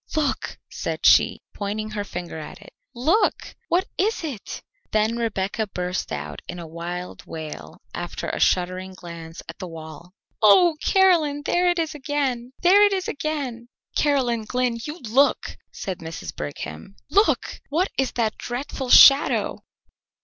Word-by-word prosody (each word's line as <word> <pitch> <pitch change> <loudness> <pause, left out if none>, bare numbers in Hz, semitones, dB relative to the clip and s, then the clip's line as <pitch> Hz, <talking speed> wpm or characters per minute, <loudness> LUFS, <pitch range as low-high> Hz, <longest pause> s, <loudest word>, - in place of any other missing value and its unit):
"Look!" 295 -3 -1
said - - -4
she, - - +5
pointing 215 +1 -4
her 210 -1 -3
finger 175 -4 -6
at 155 - -9
it. - - -15 0.2
"Look! 315 - +1
What 360 +2 +2
is 420 0 +1
it?" 270 -10 -6 0.3
Then 215 +2 +1
Rebecca 220 -2 -1
burst 180 -1 -3
out - - -5
in 175 - -6
a 170 - -7
wild 170 +2 -6
wail 150 - -8
after - - -5
a - - -3
shuddering 185 +1 +1
glance 170 -2 -9
at - - -9
the 185 - -5
wall: 165 +2 -10 0.3
"Oh, 315 - +6
Caroline, 330 -7 +3
there 355 +4 +2
it 350 - +1
is 325 -1 -1
again! 265 -4 -2
There 390 +4 +7
it 410 -1 +4
is 375 -1 -1
again!" 275 -5 -4 0.3
"Caroline 250 -6 +1
Glynn, 250 0 0
you 300 +5 -5
look!" 255 +5 +2 0.2
said 190 -4 -5
Mrs. 160 - -7
Brigham. 75 - -7 0.2
"Look! 410 +2 +2
What 345 +7 +1
is 265 -1 0
that 225 -3 -1
dreadful 255 +1 -4
shadow?" 275 +3 +7
235 Hz, 150 wpm, -23 LUFS, 180-295 Hz, 0.3 s, There